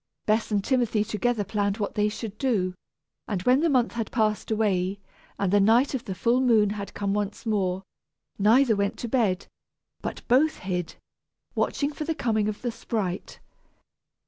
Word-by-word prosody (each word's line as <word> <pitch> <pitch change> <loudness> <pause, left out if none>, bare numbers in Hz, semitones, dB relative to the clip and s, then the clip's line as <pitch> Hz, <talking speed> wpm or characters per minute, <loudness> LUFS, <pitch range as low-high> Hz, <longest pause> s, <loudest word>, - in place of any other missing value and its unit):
Bess 215 +1 +1
and 205 -2 +1
Timothy 240 -4 +1
together 215 +1 0
planned 200 0 -1
what 205 -2 -2
they 210 0 +2
should 215 -1 -6
do, 205 -9 +1 0.5
and 190 -4 -2
when 250 +4 +4
the 330 +2 +2
month 250 -4 +2
had 230 -2 -3
passed 215 -3 0
away, 200 -3 0 0.4
and 195 -1 0
the 205 - +6
night 230 +8 +4
of 260 -2 -3
the 190 -4 -4
full 235 +6 +2
moon 220 -5 +4
had 200 -2 -6
come 200 -1 -1
once 205 +2 -3
more, 190 -4 0 0.6
neither 225 +3 +5
went 200 0 -1
to 240 - -4
bed, 215 -6 +1 0.6
but - - -6
both 285 +6 +4
hid, 180 -3 -3 0.6
watching 285 +1 0
for 305 - -5
the 325 0 -1
coming 220 -6 +1
of 210 - -6
the 240 - -1
sprite. 200 -5 -4
215 Hz, 170 wpm, -26 LUFS, 200-240 Hz, 0.6 s, the